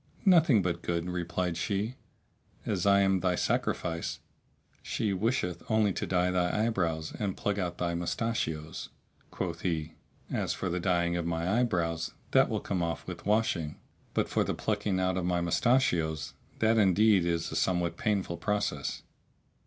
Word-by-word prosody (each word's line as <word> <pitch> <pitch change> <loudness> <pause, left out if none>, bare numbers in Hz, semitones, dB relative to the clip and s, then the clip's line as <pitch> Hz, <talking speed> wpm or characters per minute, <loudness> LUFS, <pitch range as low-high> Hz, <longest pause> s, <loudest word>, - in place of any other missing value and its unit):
"Nothing 160 - +6
but 85 -1 -1
good," 85 0 -2
replied 90 -1 -2
she, 100 +6 -1 0.7
"as 100 -2 0
I 100 0 +6
am 95 -1 +3
thy 90 -1 +1
sacrifice! 85 -1 -1 0.6
She 105 -3 -1
wisheth 95 -4 -1
only 110 -3 +3
to - - -3
dye 90 0 +2
thy 90 +4 +1
eyebrows 85 -8 -1
and 100 -3 -2
pluck 105 0 -1
out 90 -2 -2
thy 85 -1 -1
mustachios." 85 -3 -2 0.4
Quoth 85 -2 -4
he, 80 -3 -2 0.4
"As - - 0
for - - -2
the 90 +1 -1
dyeing 85 -1 +1
of 85 -1 -2
my 85 +6 0
eye 125 - +4
brows, 85 -5 -1 0.2
that - - +5
will - - -1
come 95 -3 -2
off 85 -2 -2
with 90 0 -7
washing,[FN#645] 100 -8 +1 0.4
but - - +2
for - - +1
the - - -2
plucking 105 -3 -1
out 95 0 +1
of 90 - -1
my 90 -1 +1
mustachios, 85 - +1 0.2
that 110 0 +3
indeed 100 0 +5
is 85 -1 -1
a - - -4
somewhat 90 -2 +1
painful 100 -4 -1
process." 105 -1 -2
90 Hz, 160 wpm, -30 LUFS, 85-105 Hz, 0.7 s, Nothing